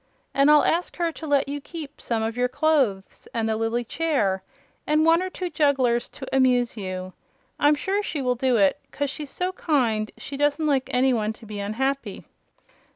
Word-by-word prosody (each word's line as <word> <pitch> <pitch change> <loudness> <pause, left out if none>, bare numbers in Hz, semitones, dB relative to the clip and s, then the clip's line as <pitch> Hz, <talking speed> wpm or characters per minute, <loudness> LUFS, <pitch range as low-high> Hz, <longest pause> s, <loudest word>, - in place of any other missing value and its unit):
And 275 +1 +4
I'll 300 0 +7
ask 345 +2 0
her 340 -1 0
to 320 0 -8
let 285 -1 +2
you 285 +1 -4
keep 310 -1 -9
some 225 -2 -1
of 225 +1 -2
your 250 0 +1
clothes 260 -10 0
and 225 -1 0
the 220 - 0
lily 225 +2 -1
chair 230 -9 0 0.5
and 305 +1 +3
one 330 +1 +5
or 370 - -2
two 370 0 -4
jugglers 270 -6 +2
to 275 - -9
amuse 250 -2 +3
you. 185 -3 -5 0.5
I'm 295 +1 +5
sure 390 +7 -1
she 325 -7 -3
will 250 -2 +1
do 250 0 +1
it, 200 +7 +3
'cause 285 -1 -2
she's 295 -2 -6
so 365 +5 -2
kind 240 -12 0
she 280 - -6
doesn't 290 +2 +1
like 275 -4 +1
any 255 +1 +3
one 215 -2 0
to 225 - -15
be 210 -1 -7
unhappy." 265 +7 -2
270 Hz, 195 wpm, -24 LUFS, 225-300 Hz, 0.5 s, I'll